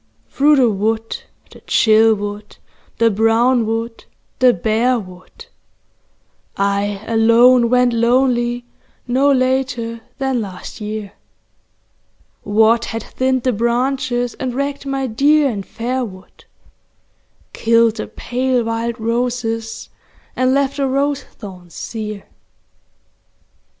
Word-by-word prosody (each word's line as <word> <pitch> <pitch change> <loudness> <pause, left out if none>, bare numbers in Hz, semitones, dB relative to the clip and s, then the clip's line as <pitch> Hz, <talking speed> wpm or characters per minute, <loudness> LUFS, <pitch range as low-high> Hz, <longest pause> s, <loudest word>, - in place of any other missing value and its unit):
Through 295 +2 +4
the 250 -5 +3
wood, 220 +3 -2 0.3
the - - -15
chill 220 0 +4
wood, 205 0 -7 0.4
the 230 0 +3
brown 225 +3 +2
wood, 225 +1 -4 0.3
the 255 -1 +6
bare 225 +6 +1
wood, 185 - -11 1.1
I 200 +1 -1
alone 235 +2 +4
went 250 0 +3
lonely 240 0 +1 0.4
no 265 +3 +2
later 255 -3 0 0.2
than 265 -3 -1
last 195 +2 -8
year, 210 -1 -5 1.3
What 220 +3 +3
had 225 -1 -5
thinned 260 -1 -1
the 255 - +1
branches, 245 +2 -1
and 255 -2 -3
wrecked 280 +1 -3
my 270 0 -1
dear 280 +4 +3
and 200 -3 -5
fair 250 +5 -3
wood, 185 -5 -11 1.1
Killed 230 0 +2
the - - -4
pale 250 0 -1
wild 230 +1 -3
roses 230 -1 -2 0.5
and 255 0 +2
left 275 +1 0
the 275 -1 0
rose 275 +1 0
thorns 180 -5 -12
sere 215 -3 -6
235 Hz, 110 wpm, -18 LUFS, 220-255 Hz, 1.3 s, the